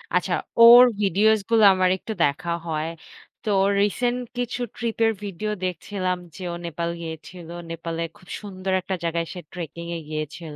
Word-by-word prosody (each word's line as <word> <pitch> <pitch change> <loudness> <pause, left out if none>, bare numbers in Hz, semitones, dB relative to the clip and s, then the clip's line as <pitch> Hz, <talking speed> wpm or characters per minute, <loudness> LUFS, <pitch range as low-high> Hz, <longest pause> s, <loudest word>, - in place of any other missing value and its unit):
আচ্ছা - - +1 0.3
ওর 235 +2 +11 0.2
ভিডিওস 210 +3 +4
গুলা 225 -2 +5
আমার 185 0 +3
একটু 220 - -6
দেখা 145 +4 0 0.2
হয়, 155 -1 -1 0.6
তো 220 - -2 0.3
রিসেন্ট 240 +4 +1 0.2
কিছু 245 0 -2 0.2
ট্রিপ 230 -2 -3
এর 225 - +4
ভিডিও 205 +2 -3
দেখছিলাম 185 +1 -2 0.2
যে, - - -10
ও - - -4
নেপাল 170 0 -3
গিয়েছিল। 165 +1 -8 0.2
নেপালের 165 0 -4
খুব 185 - -20
সুন্দর 190 -2 -5
একটা 190 +1 -3
জায়গায় 170 0 -1
সে 180 - -7
ট্রেকিং 170 -1 -6
এ - - -5
গিয়েছিল। 155 +1 -5
185 Hz, 160 wpm, -24 LUFS, 165-215 Hz, 0.6 s, ওর